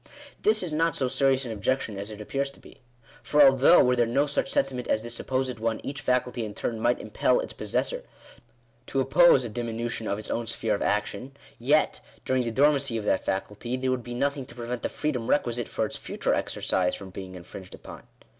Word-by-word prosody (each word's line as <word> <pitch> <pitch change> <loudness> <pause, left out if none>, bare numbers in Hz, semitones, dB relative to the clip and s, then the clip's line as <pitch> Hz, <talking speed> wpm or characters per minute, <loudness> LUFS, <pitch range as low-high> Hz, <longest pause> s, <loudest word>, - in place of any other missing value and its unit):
This 215 -1 +2
is 170 -4 -3
not 165 0 +1
so 130 - +1
serious 135 0 +2
an 120 - -4
objection 110 +1 -1
as 100 +2 -5
it 105 -1 -9
appears 135 +6 -2
to 140 - -16
be. - - -17 0.4
For 150 - 0
although, 135 +5 +7
were 125 0 +3
there 120 -1 +2
no 135 +5 +2
such 145 - -1
sentiment 130 -2 -1
as 110 - +1
this 120 0 -4
supposed 130 0 -2
one, 115 0 -1
each 140 +1 -5
faculty 125 -1 0
in 105 -2 -6
turn 115 -2 -3
might 120 +2 +2
impel - - +1
its - - -4
possessor - - -2 0.9
to 135 - -1
oppose 135 +1 +5
a - - -2
dimi 115 0 -4
nution 120 -2 -3
of 100 - 0
its 110 - -6
own 115 0 -2
sphere 115 -1 -1
of 100 - -2
action, 105 +6 -2 0.2
yet, 145 +6 +2 0.3
during 130 0 +2
the 120 - -2
dormancy 140 0 +3
of 105 - -4
that 95 - +1
faculty, 105 +6 -3
there 130 0 0
would 130 -1 -1
be 120 0 -7
nothing 140 0 -1
to 120 - -14
prevent 120 0 -4
the - - -2
freedom 130 -7 -2
requi 120 -5 +2
site 120 -1 -4
far - - -1
its - - -6
future - - -2
exercise 90 -1 0
from 95 -1 -10
being 95 0 -8
infringed 90 +1 -10
upon. - - -12
125 Hz, 220 wpm, -27 LUFS, 110-135 Hz, 0.9 s, although